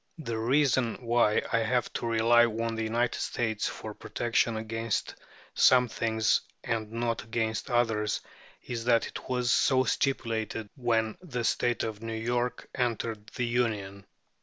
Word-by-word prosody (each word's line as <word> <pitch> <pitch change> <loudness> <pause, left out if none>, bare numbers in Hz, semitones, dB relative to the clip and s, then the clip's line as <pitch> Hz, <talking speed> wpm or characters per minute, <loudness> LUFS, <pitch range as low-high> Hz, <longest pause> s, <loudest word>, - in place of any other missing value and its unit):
The 115 -8 -4
reason 130 0 +2
why 115 -2 +3
I 115 - +4
have 120 +2 0
to - - -3
rely 115 +1 +5
on 115 0 -2
the 115 - -3
United 115 +2 0
States 110 -3 -1
for - - -6
protection 115 -1 0
against 115 0 -2 0.4
some 125 -1 +5
things 110 -1 +1 0.2
and 110 -2 -2
not 115 0 -1
against 110 +1 -2
others 110 -3 +1 0.4
is 120 -2 -4
that 120 -2 +4
it - - -8
was 125 -1 +1
so 130 -1 +4
stipulated 115 -5 -1
when 115 -4 0
the 125 -10 -4
State 120 +1 +1
of 110 -1 -4
New 115 0 -4
York 120 +2 -2
entered 115 -4 -2
the 125 - 0
Union. 105 -5 -1
115 Hz, 145 wpm, -29 LUFS, 110-120 Hz, 0.4 s, rely